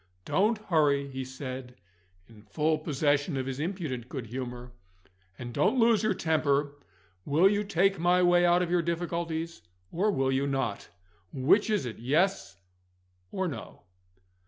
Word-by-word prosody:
"Don't 215 Hz, +4 st, +2 dB
hurry," 150 Hz, -9 st, +1 dB
he 130 Hz, -1 st, -5 dB
said, 130 Hz, -1 st, -7 dB, 0.5 s
in 110 Hz, -2 st, -16 dB
full 150 Hz, +10 st, 0 dB
possession 145 Hz, 0 st, 0 dB
of 130 Hz, -, -2 dB
his 135 Hz, 0 st, -5 dB
impudent 150 Hz, -, -4 dB
good 130 Hz, -5 st, -5 dB
humour; 125 Hz, +1 st, -6 dB, 0.7 s
"and 120 Hz, 0 st, -7 dB
don't 260 Hz, -, +2 dB
lose 230 Hz, -2 st, +4 dB
your 215 Hz, -3 st, +1 dB
temper. 145 Hz, -4 st, +1 dB, 0.5 s
Will 160 Hz, +6 st, +4 dB
you 205 Hz, +1 st, +1 dB
take 195 Hz, -1 st, +1 dB
my 180 Hz, +2 st, +3 dB
way 175 Hz, 0 st, +4 dB
out 175 Hz, +1 st, +4 dB
of 175 Hz, -, -3 dB
your 175 Hz, -1 st, +3 dB
difficulties, 170 Hz, -, -3 dB, 0.3 s
or 195 Hz, +6 st, +1 dB
will 135 Hz, -9 st, +1 dB
you 135 Hz, +1 st, 0 dB
not? 135 Hz, -7 st, -2 dB, 0.4 s
Which 150 Hz, -, +3 dB
is 210 Hz, -9 st, 0 dB
it 120 Hz, -, -6 dB
Yes 145 Hz, -, 0 dB, 0.7 s
or 190 Hz, -1 st, -1 dB
No?" 155 Hz, -, -8 dB
155 Hz, 150 wpm, -28 LUFS, 130-180 Hz, 0.7 s, lose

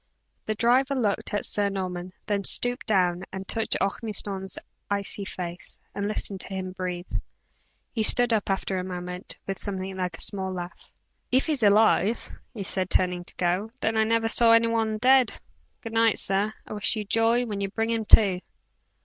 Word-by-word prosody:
The 215 Hz, -, -1 dB
driver 255 Hz, +5 st, +3 dB
looked 215 Hz, -6 st, -1 dB
at 205 Hz, -, 0 dB
Sir 205 Hz, -1 st, +1 dB
Norman, 185 Hz, -2 st, -4 dB
then 200 Hz, -1 st, -1 dB
stooped 245 Hz, +5 st, +2 dB
down 180 Hz, -4 st, +2 dB
and 190 Hz, 0 st, -7 dB
touched 225 Hz, -1 st, +2 dB
Ormiston's 195 Hz, -2 st, -2 dB, 0.3 s
icy 200 Hz, 0 st, -1 dB
face, 175 Hz, -2 st, -6 dB, 0.2 s
and 200 Hz, 0 st, -2 dB
listened 205 Hz, -2 st, -3 dB
to -, -, -2 dB
hear 190 Hz, -, -5 dB
him 185 Hz, -1 st, -4 dB
breathe. 180 Hz, -1 st, -4 dB, 0.9 s
He 225 Hz, -, -1 dB
stood 240 Hz, +2 st, +4 dB
up 210 Hz, -2 st, 0 dB
after 190 Hz, -1 st, -1 dB
a -, -, -3 dB
moment, 180 Hz, 0 st, -5 dB
with 195 Hz, -1 st, -4 dB
some 200 Hz, -2 st, -2 dB
thing 190 Hz, 0 st, -5 dB
like 180 Hz, -3 st, -3 dB
a -, -, -2 dB
small 190 Hz, -2 st, 0 dB
laugh. 175 Hz, -1 st, -8 dB, 0.4 s
"If 260 Hz, +2 st, +3 dB
he's 300 Hz, -5 st, -1 dB
alive," 215 Hz, +1 st, +3 dB, 0.2 s
he 210 Hz, -, -6 dB
said, 185 Hz, -1 st, -1 dB
turning 180 Hz, -1 st, +1 dB
to -, -, -8 dB
go, 180 Hz, +4 st, 0 dB
"then 225 Hz, -, 0 dB
I 220 Hz, -, +4 dB
never 225 Hz, 0 st, +1 dB
saw 230 Hz, 0 st, +5 dB
any 230 Hz, 0 st, +5 dB
one 225 Hz, -1 st, 0 dB
dead! 255 Hz, +1 st, +4 dB, 0.5 s
Good 225 Hz, -2 st, -7 dB
night, 225 Hz, -1 st, +3 dB
sir, 195 Hz, +2 st, 0 dB
I -, -, -8 dB
wish 210 Hz, +3 st, +1 dB
you 215 Hz, -1 st, -3 dB
joy 225 Hz, +4 st, +2 dB
when 205 Hz, -3 st, -4 dB
you 195 Hz, -, -1 dB
bring 225 Hz, +3 st, -1 dB
him 225 Hz, -1 st, -1 dB
to." 195 Hz, -4 st, +6 dB
200 Hz, 190 wpm, -26 LUFS, 185-225 Hz, 0.9 s, to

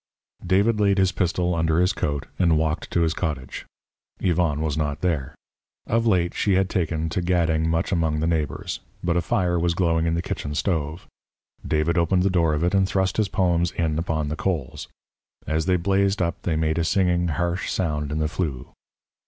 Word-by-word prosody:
David 100 Hz, +5 st, +2 dB
laid 100 Hz, -1 st, +3 dB
his 95 Hz, -1 st, +3 dB
pistol 90 Hz, -1 st, 0 dB
under 80 Hz, 0 st, +1 dB
his 90 Hz, +2 st, +3 dB
coat 75 Hz, -5 st, -2 dB
and 85 Hz, -4 st, +4 dB
walked 80 Hz, +1 st, -1 dB
to 85 Hz, -, +1 dB
his 80 Hz, -1 st, +2 dB
cottage. 75 Hz, -8 st, -4 dB, 0.5 s
Yvonne 85 Hz, -5 st, +1 dB
was 80 Hz, -2 st, -1 dB
not 75 Hz, -2 st, -2 dB
there. 80 Hz, -7 st, -1 dB, 0.5 s
Of 115 Hz, +1 st, +1 dB
late 90 Hz, -5 st, +2 dB
she 100 Hz, -, +1 dB
had 95 Hz, 0 st, +2 dB
taken 80 Hz, -2 st, -1 dB
to 90 Hz, -, -1 dB
gadding 80 Hz, -2 st, +1 dB
much 80 Hz, 0 st, 0 dB
among 80 Hz, -4 st, +1 dB
the 80 Hz, -, 0 dB
neighbours. 80 Hz, -4 st, -2 dB, 0.2 s
But 85 Hz, -1 st, +1 dB
a 85 Hz, -, +2 dB
fire 90 Hz, -1 st, 0 dB
was 85 Hz, 0 st, +1 dB
glowing 85 Hz, -2 st, +1 dB
in 80 Hz, -, +1 dB
the 85 Hz, -, -2 dB
kitchen 75 Hz, -3 st, -4 dB
stove. 80 Hz, -1 st, -2 dB, 0.6 s
David 80 Hz, +3 st, +1 dB
opened 90 Hz, +2 st, +2 dB
the 95 Hz, -, +2 dB
door 85 Hz, -4 st, +2 dB
of 75 Hz, -, -1 dB
it 90 Hz, +2 st, +1 dB
and 95 Hz, -1 st, +3 dB
thrust 95 Hz, -1 st, 0 dB
his 105 Hz, -3 st, +1 dB
poems 85 Hz, -2 st, +1 dB
in 80 Hz, -2 st, 0 dB
upon 80 Hz, -3 st, -1 dB
the 75 Hz, -, -2 dB
coals. 80 Hz, -7 st, -3 dB, 0.6 s
As 80 Hz, +3 st, -1 dB
they 90 Hz, -, +3 dB
blazed 100 Hz, +3 st, +1 dB
up 85 Hz, -2 st, -1 dB
they 85 Hz, -, -1 dB
made 80 Hz, +1 st, 0 dB
a -, -, +2 dB
singing, 90 Hz, 0 st, +2 dB
harsh 85 Hz, +2 st, -1 dB
sound 75 Hz, -5 st, -1 dB
in 75 Hz, -, -2 dB
the 80 Hz, 0 st, +1 dB
flue. 80 Hz, -6 st, -4 dB
85 Hz, 195 wpm, -24 LUFS, 80-90 Hz, 0.6 s, and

